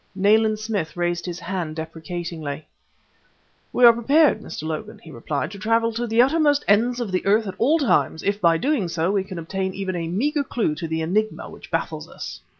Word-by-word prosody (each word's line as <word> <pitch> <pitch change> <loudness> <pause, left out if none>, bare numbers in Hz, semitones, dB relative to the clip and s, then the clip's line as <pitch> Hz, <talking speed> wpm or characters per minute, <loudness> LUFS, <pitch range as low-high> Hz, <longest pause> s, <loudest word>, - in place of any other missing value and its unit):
Nayland 215 +2 +3
Smith 210 -7 -3
raised 175 0 -1
his 175 0 -5
hand 170 -3 -4
deprecatingly. 160 -2 -6 1.1
"We 245 - +5
are 235 - +10
prepared, 280 +7 +3
Mr. - - -7
Logan," 155 -1 -5
he 160 - -14
replied, 140 +6 -3
"to 200 - -9
travel 230 +2 +1
to 240 +2 -2
the 230 +2 +5
uttermost 290 +1 +2
ends 235 +5 +3
of 230 -5 -3
the 185 - 0
earth 215 +3 +3
at 190 - -4
all 285 +8 +4
times, 260 - +1
if 200 +1 -1
by 165 -2 +4
doing 265 - 0
so 165 +2 0
we 200 -2 +1
can 190 -2 -8
obtain 190 +3 -3
even 190 -1 -3
a 165 -1 -3
meager 285 - 0
clue 230 - -1
to 165 +2 -5
the 160 0 -2
enigma 215 +6 -1
which - - -13
baffles - - -3
us." - - -8
195 Hz, 200 wpm, -23 LUFS, 170-230 Hz, 1.1 s, are